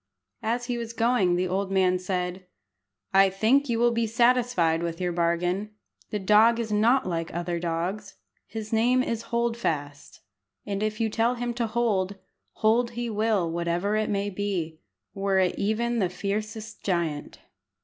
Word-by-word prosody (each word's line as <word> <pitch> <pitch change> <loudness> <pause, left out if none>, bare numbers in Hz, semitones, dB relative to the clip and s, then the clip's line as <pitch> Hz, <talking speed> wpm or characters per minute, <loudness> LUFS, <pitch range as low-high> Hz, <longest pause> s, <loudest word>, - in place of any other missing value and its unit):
As 240 +2 -1
he 245 -1 -2
was 230 -1 -5
going 230 -6 +2
the 180 +1 0
old 190 +2 -2
man 185 -1 +3
said 180 0 -3 0.7
"I 195 0 +6
think 230 +9 +2
you 235 - +1
will 240 +1 +3
be 230 -1 0
satisfied 235 -8 +2
with 170 -1 -3
your 180 -1 -1
bargain. 175 +5 -1 0.3
The 210 - -2
dog 215 +4 +4
is 225 -2 -3
not 225 +3 +3
like 165 -2 -2
other 175 0 -2
dogs. 170 +4 -3 0.3
His 220 0 -6
name 245 +3 +3
is 230 -3 -2
Hold 235 0 0
fast, 145 -10 -4 0.4
and 200 -1 -3
if 215 0 -2
you 225 - +2
tell 230 +3 +1
him 240 0 -3
to 235 -1 -1
hold, 215 -4 0 0.4
hold 230 +2 +2
he 240 -1 -2
will 210 -5 +1
whatever 170 +4 -1
it 215 0 0
may 205 0 -1
be, 180 -5 -3 0.3
were 195 -1 0
it 185 -1 +3
even 230 +3 0
the 185 -4 +1
fiercest 215 +3 -4
giant." 170 -6 -2
205 Hz, 165 wpm, -26 LUFS, 180-230 Hz, 0.7 s, I